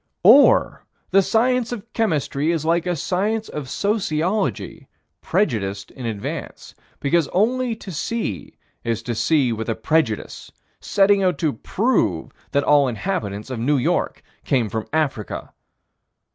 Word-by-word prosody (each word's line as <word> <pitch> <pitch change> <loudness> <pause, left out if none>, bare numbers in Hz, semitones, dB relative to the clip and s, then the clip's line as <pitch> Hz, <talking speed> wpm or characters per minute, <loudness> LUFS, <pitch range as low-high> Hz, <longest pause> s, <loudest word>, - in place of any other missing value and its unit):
Or 245 +10 +6 0.3
the 195 +1 +6
science 240 +4 +1
of 230 -1 -7
chemistry 155 - 0
is 160 -2 -2
like 170 +2 +1
a 175 - 0
science 205 +7 -1
of 145 -4 -6
sociology, 175 - -1 0.3
prejudiced 100 - -1
in 125 -3 -6
advance, 105 -3 -6 0.3
because 155 +2 +2
only 240 +4 +1
to 205 -3 -9
see 165 - -4 0.3
is 115 -1 -2
to 120 - -3
see 130 +1 +2
with 115 +1 -4
a 115 - 0
prejudice, 115 -2 -1 0.3
setting 200 0 +3
out 185 -1 +1
to 155 -4 0
"prove" 115 - 0 0.2
that 140 - +1
all 145 -2 +4
inhabitants 115 - -3
of 125 - -4
New 140 +5 +2
York 160 +8 -1 0.2
came 125 -6 +1
from 110 0 -4
Africa. 145 -9 -2
155 Hz, 135 wpm, -22 LUFS, -, 0.3 s, Or